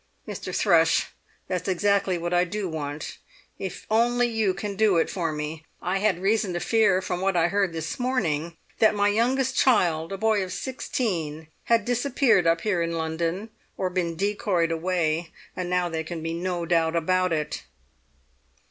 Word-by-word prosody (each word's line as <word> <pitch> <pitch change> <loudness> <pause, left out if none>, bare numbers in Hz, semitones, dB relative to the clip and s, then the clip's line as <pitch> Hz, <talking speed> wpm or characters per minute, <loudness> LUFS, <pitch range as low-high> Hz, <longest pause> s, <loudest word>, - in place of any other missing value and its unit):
"Mr. - - -5
Thrush, - - +3 0.4
that's 180 0 -3
exactly 195 0 +2
what 175 +1 -3
I 175 0 +4
do 200 +2 -3
want, 150 -2 -5 0.4
if 190 - -6
only 240 +2 +3
you 220 -4 +1
can 200 +1 -4
do 205 -3 +3
it 165 - +1
for 170 -4 -1
me! 150 +1 -5 0.2
I 185 +2 -1
had 190 -3 +1
reason 210 -2 +1
to 175 - -1
fear, 195 0 +3
from 180 0 -3
what 190 -1 +1
I 170 0 +3
heard 200 -2 +1
this 160 +4 -4
morning, 170 - -1 0.2
that 220 -1 +5
my 205 0 +3
youngest 255 +5 +1
child, 170 -12 +3
a 195 - -3
boy 215 -1 +2
of 185 - -6
sixteen, 170 - -3 0.2
had 230 -3 +3
disappeared 245 -6 +2
up 165 0 +3
here 200 -5 0
in 170 0 -1
London, 165 +6 -2 0.3
or 185 -1 -1
been 175 -2 -1
decoyed 195 -3 0
away. 165 -1 0 0.2
And 180 -1 -3
now 180 -1 +1
there 160 -1 -3
can 160 0 -6
be 165 0 -2
no 175 0 -2
doubt 165 -1 +2
about 185 +2 +1
it!" 155 -2 -2
180 Hz, 175 wpm, -25 LUFS, 165-210 Hz, 0.4 s, that